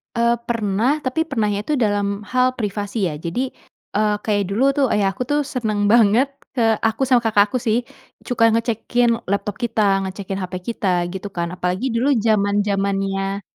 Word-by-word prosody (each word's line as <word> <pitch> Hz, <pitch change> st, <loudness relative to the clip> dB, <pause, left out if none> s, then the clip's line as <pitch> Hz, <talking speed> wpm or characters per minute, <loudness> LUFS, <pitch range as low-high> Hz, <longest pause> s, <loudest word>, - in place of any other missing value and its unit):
Eee, 235 Hz, 0 st, +3 dB, 0.2 s
pernah, 230 Hz, +5 st, 0 dB
tapi 310 Hz, +5 st, -1 dB
pernahnya 210 Hz, -8 st, 0 dB
itu 305 Hz, -, -1 dB
dalam 205 Hz, -4 st, 0 dB
hal 255 Hz, 0 st, +2 dB
privasi 205 Hz, -2 st, -2 dB
ya. -, -, -5 dB
Jadi, 240 Hz, +12 st, -3 dB, 0.5 s
eee, 210 Hz, 0 st, +2 dB
kayak 205 Hz, -2 st, +1 dB
dulu 210 Hz, +6 st, 0 dB
tuh 280 Hz, -, +4 dB
ayah 205 Hz, -2 st, +2 dB
aku 250 Hz, +6 st, -4 dB
tuh 290 Hz, 0 st, +2 dB
seneng 215 Hz, -5 st, 0 dB
banget 230 Hz, +3 st, +5 dB, 0.3 s
ke 245 Hz, -, 0 dB, 0.3 s
aku 225 Hz, +3 st, -3 dB
sama 250 Hz, -2 st, +4 dB
Kakak 210 Hz, -2 st, +4 dB
aku -, -, 0 dB
sih. 220 Hz, +1 st, +3 dB, 0.5 s
Cuka 245 Hz, -2 st, +1 dB
ngecekin 230 Hz, +1 st, +1 dB, 0.2 s
laptop 200 Hz, 0 st, -1 dB
kita, 230 Hz, -2 st, 0 dB, 0.3 s
ngecekin 195 Hz, 0 st, -5 dB
hape 185 Hz, 0 st, -4 dB
kita 230 Hz, -3 st, -2 dB, 0.3 s
gitu 190 Hz, +1 st, -5 dB
kan. 170 Hz, -1 st, -1 dB
Apalagi 180 Hz, +5 st, -2 dB
dulu 250 Hz, +5 st, +2 dB, 0.2 s
jaman-jamannya 200 Hz, -2 st, 0 dB
210 Hz, 165 wpm, -21 LUFS, 200-240 Hz, 0.5 s, banget